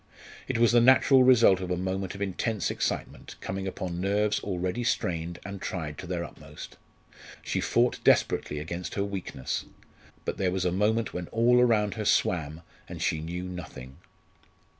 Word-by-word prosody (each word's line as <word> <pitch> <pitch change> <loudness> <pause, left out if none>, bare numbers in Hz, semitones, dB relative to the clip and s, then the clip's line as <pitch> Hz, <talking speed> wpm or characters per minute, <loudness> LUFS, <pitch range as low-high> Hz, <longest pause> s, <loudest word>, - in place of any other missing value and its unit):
It 130 - -1
was 115 0 +4
the 120 0 +5
natural 130 +2 +6
result 120 -7 +6
of 90 -1 -5
a 90 - 0
moment 95 +1 -3
of 100 - -3
intense 100 +2 -1
excitement - - -4
coming 95 0 -4
upon 90 -2 -4
nerves 105 +2 +1
already 95 +4 -3
strained 85 -7 -1
and 100 -1 -7
tried 80 -6 -4
to 90 - -7
their 85 -1 -2
utmost. - - -11 0.7
She - - -1
fought 120 +1 +1
desperately 75 - +2
against 85 +4 -5
her 100 - 0
weakness; 95 -10 -4 0.6
but - - -3
there 95 - +1
was 95 0 -1
a 90 - +2
moment 105 +4 +1
when 90 -1 -4
all 120 +2 +3
around 110 -4 +3
her 110 -2 -4
swam, 80 -4 +1 0.3
and - - -7
she 80 - 0
knew 85 +3 -5
nothing. 80 -8 -8
95 Hz, 165 wpm, -28 LUFS, 90-110 Hz, 0.7 s, natural